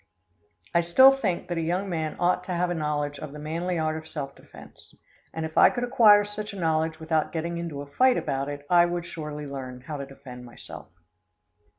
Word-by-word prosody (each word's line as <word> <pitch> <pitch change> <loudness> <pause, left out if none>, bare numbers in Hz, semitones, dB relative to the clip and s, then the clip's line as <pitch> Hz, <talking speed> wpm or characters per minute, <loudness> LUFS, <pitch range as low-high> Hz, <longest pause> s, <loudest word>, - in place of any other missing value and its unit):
I 170 - +4
still 215 +11 +7
think 215 -10 -2
that 175 -2 -2
a - - 0
young 180 +5 -1
man 160 -4 -3
ought 180 +1 +1
to 180 - -3
have 175 0 0
a - - +1
knowledge 150 -2 -2
of 150 -2 -8
the - - -8
manly 165 +4 -3
art 155 -1 0
of 160 0 -9
self 140 -3 -5
defense, - - -15 0.4
and 160 0 -4
if 160 - -1
I - - +8
could 245 -1 -3
acquire 225 -5 +6
such 210 0 -6
a 200 - -7
knowledge 160 -1 0
without 160 -1 0
getting 170 +1 -3
into 155 -4 -5
a - - -10
fight 250 - +3
about 140 -1 -2
it 145 0 -7
I 175 +1 +5
would 175 0 -3
surely 150 -3 -6
learn 130 -3 -7
how 150 +3 -6
to 140 -1 -6
defend 130 -2 -11
myself. 120 -1 -11
160 Hz, 215 wpm, -26 LUFS, 145-180 Hz, 0.4 s, I